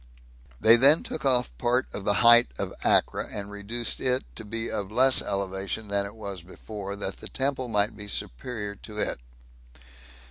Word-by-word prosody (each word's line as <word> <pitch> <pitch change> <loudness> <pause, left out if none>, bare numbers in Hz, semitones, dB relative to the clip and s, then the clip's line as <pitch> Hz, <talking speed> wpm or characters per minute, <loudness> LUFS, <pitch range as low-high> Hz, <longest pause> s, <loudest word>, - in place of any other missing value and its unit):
They 115 +2 +7
then 140 +6 +6
took 155 - -5
off 125 - +2
part 125 +2 +1
of 100 - -6
the 105 - +2
height 120 +1 +8
of - - -4
Acra, - - +2
and 100 0 -6
reduced 110 +4 -3
it 130 -1 +1
to - - -7
be 115 +2 -4
of 100 -1 -4
less 130 +3 +4
elevation 100 +2 -3
than 100 0 0
it 105 - -12
was 100 -4 -7
before, 100 +3 -8
that 100 -1 -4
the - - -9
temple 135 -1 -2
might 105 -2 +1
be 105 -1 -7
superior 105 - -4
to 105 +1 -11
it. 105 - -1
105 Hz, 175 wpm, -26 LUFS, 100-120 Hz, -, height